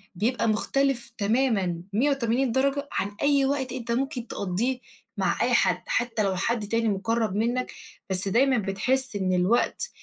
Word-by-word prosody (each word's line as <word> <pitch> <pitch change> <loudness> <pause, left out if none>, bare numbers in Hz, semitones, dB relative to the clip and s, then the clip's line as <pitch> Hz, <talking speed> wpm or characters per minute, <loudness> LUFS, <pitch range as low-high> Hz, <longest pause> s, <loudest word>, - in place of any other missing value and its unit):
بيبقى 230 +6 0
مختلف 240 +3 0
تمامًا 205 -6 +1
180 255 0 +1
درجة 275 +3 0
عن 200 - -2
أي 280 -1 +3
وقت 270 -2 -1
أنت 235 -2 -4
ممكن 250 0 -2
تقضيه 215 +8 -2 0.4
مع - - 0
أي - - +2
حد، - - +2
حتى 235 -3 0
لو 195 -2 0
حد 215 +3 -1
تاني 230 +1 +1
مقرب 215 +1 -1
منك، 240 +4 -1 0.4
بس 190 +1 +2
دايمًا 255 +6 +3
بتحس 225 +5 +1
إن 190 -2 0
الوقت 210 - +1
235 Hz, 150 wpm, -26 LUFS, 205-265 Hz, 0.4 s, أي